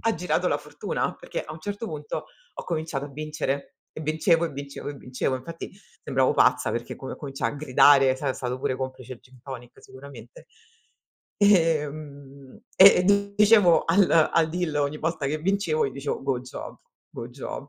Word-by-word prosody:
ha 225 -1 +1
girato 180 - 0
la - - +1
fortuna, - - -4
perché - - -5
a 155 - -8
un 155 - -10
certo 205 +6 -5
punto 150 -4 -5 0.3
ho - - -7
cominciato 155 -4 -3
a - - -11
vincere. 150 -1 -4 0.2
E - - -8
vincevo, 160 +2 +2
e - - -7
vincevo, 140 0 -7
e 145 - -5
vincevo. 130 -1 -3
Infatti 165 +6 -8 0.3
sembravo 130 0 +1
pazza 125 0 +3
perché 120 0 -4
co 135 - -7
cominciai 135 -2 -3
a - - -8
gridare, 135 -1 +5
sai 135 0 -2
è - - -3
stato 125 0 -3
pure 130 - -1
complice 130 -1 -6
il - - -18
gin 130 -1 -20
tonic 125 -3 -10
sicuramente. 130 -3 -13 1.0
Ehm, 150 - 0 0.2
e, 195 +1 +9
ehm, 200 +1 +2
dicevo 205 -4 +5
al 180 +3 +3 0.2
al 165 -1 +3
deal 175 -2 -2
ogni 145 +1 -1
volta 160 -2 -2
che 155 +3 -1
vincevo, 170 -3 0
io - - -4
dicevo: 140 +1 -4
"Good 135 -2 -1
job, 125 - -8 0.3
good 115 - -8
job." 135 +2 -7
145 Hz, 180 wpm, -25 LUFS, 135-165 Hz, 1.0 s, e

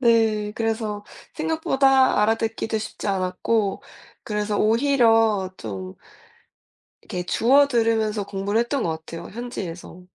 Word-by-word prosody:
네 220 -3 +2
그래서 220 -2 -2 0.3
생각보다 270 -7 +3
알아듣기도 225 0 0
쉽지 215 - -6
않았고 195 +2 0 0.4
그래서 210 -1 -2
오히려 225 -4 +3
좀 95 -4 -6 1.1
이렇게 180 -1 -5
주워들으면서 230 -3 +2
공부를 200 +2 -1
했던 245 +2 -1
것 - - 0 0.2
같아요 170 +1 -8
현지에서. 185 -6 -7
220 Hz, 275 characters per minute, -23 LUFS, 200-235 Hz, 1.1 s, 생각보다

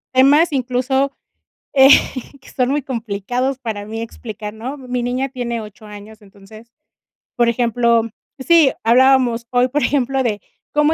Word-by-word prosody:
temas 290 +6 +5
incluso, 265 +1 0 0.6
eh, 270 -1 +6 0.5
que - - -16
son 250 -1 0
muy 290 0 -1
complicados 245 +1 -3
para 220 -5 -5
mí 225 +1 -6
explicar, 215 -2 -8
¿no? 245 +6 -7
Mi 250 -2 -4
niña 255 +3 -2
tiene 240 -3 -4
8 215 0 -12
años, 210 +1 -12
entonces, 205 +3 -16 0.6
por 240 -1 +2
ejemplo 235 -1 +1 0.4
Sí, 310 0 +4
hablábamos 245 -1 +3
hoy, 250 0 +2
por 295 +3 -1
ejemplo, 270 -1 0
de 215 -4 -1 0.3
cómo 300 +1 +3
245 Hz, 145 wpm, -18 LUFS, 225-265 Hz, 0.6 s, eh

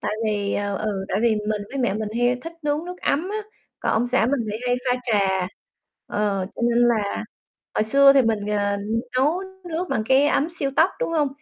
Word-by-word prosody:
Tại 210 0 -2
vì, 205 -2 0
ờ, 205 -1 -1
ừ, 205 -3 -2
tại 190 - 0
vì 235 - +5 0.2
mình 210 -1 -1
với 275 - -5
mẹ 240 -6 +1
mình 215 0 -2
hay 245 +1 +3
thích 330 - -6
nướng 295 +2 -1
nước 360 0 -6
ấm 320 +7 0
á, 425 - -2 0.4
còn - - 0
ông 235 +3 +2
xã 245 -2 +2
mình 275 -1 +1
thì 215 - -2
hay 245 0 +2
pha 250 - +3
trà, 195 -6 +1 0.6
ờ, 200 -3 -1
cho - - -5
nên 235 0 +3
là 215 -4 0 0.5
hồi - - +2
xưa 275 +4 +6
thì 275 - +5
mình, 215 -3 0
à, 205 -1 +1 0.4
nấu 305 +8 +2 0.3
nước 340 +3 -3
bằng 215 - -1
cái 265 +4 +4
ấm 295 +3 +2
siêu 285 -5 -2
tốc, 335 +4 +5
đúng - - 0
hông? 300 -4 +2
240 Hz, 220 wpm, -23 LUFS, 210-280 Hz, 0.6 s, xưa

